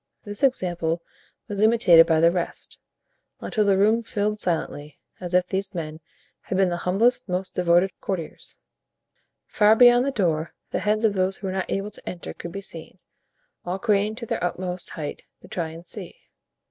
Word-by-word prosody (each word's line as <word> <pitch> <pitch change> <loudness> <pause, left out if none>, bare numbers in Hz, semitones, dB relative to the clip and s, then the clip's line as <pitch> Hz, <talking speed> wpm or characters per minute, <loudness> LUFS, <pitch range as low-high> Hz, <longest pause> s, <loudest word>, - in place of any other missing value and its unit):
This 205 -1 -4
example 175 - 0 0.4
was 205 -1 -3
imitated 215 -7 +6
by 160 -1 +3
the 170 +1 +6
rest, 175 -1 -4 0.6
until 215 -3 0
the 195 -1 +3
room 215 +4 +3
filled 210 -1 -2
silently, 150 -4 -2 0.2
as 180 -1 -3
if 180 0 +4
these 190 +1 -3
men 155 -2 -5 0.4
had 185 - -3
been 190 -1 +3
the 175 - -2
humblest, 235 +4 +2
most 185 +1 -2
devoted 180 +2 +3
courtiers. 180 -5 -5 0.9
Far 210 +1 +4
beyond 245 +2 +6
the - - +1
door 165 - -1 0.2
the - - -1
heads 215 +2 +1
of 215 - +3
those 190 0 0
who 195 - -9
were 190 - -2
not 190 0 -3
able 200 +2 -2
to - - -8
enter 175 - -7
could 170 - -8
be 195 - -6
seen, 165 -1 -8 0.7
all 180 +2 -3
craning 210 0 +1
to 235 0 -7
their - - -3
utmost 180 0 -2
height 150 -2 -6 0.2
to - - -12
try 170 -3 -3
and 165 +2 -11
see. - - -8
190 Hz, 180 wpm, -24 LUFS, 175-210 Hz, 0.9 s, imitated